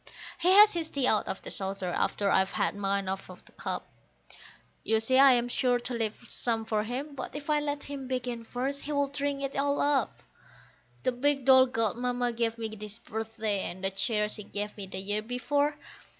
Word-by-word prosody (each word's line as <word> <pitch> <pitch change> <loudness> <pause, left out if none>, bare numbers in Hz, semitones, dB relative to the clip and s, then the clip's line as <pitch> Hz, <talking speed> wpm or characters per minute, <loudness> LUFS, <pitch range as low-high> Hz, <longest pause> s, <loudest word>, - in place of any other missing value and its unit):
He 355 - +2
has 420 +2 +8
his 330 -2 -2
tea 275 -3 0
out 215 - +3
of 190 - -4
the - - -7
saucer 195 -1 -2
after 200 +3 0
I've 190 0 +3
had - - +1
mine 200 -1 -1
out 190 0 -4
of - - -13
the - - -15
cup; - - -4 1.0
You 220 0 +2
see 260 +4 +3
I 275 -1 +8
am 240 0 +1
sure 245 0 +2
to 245 +1 -5
leave 225 -2 -1
some 225 -2 -1
for 215 -1 0
him, 270 +6 -4
but 280 - -7
if 290 +1 -3
I 300 - +3
let 290 -1 -3
him 280 -2 -6
begin 250 -2 -3
first 260 +5 -3
he 300 - -4
would 285 -1 0
drink 280 -1 -1
it 275 - -3
all 280 +1 +1
up. 285 -2 +1 0.8
The 255 - +2
big 275 +2 0
doll 260 -1 +7
Godmamma 245 +1 -1
gave 230 0 0
me 225 -1 -3
this 210 0 -7
birthday, 220 -2 -3
and 185 +2 -9
the 195 - +1
chair 210 +2 0
she 210 0 -2
gave 205 +1 -4
me 200 -2 -6
the 190 - -6
year 205 +2 -1
before. 285 +6 0
245 Hz, 205 wpm, -29 LUFS, 210-275 Hz, 1.0 s, has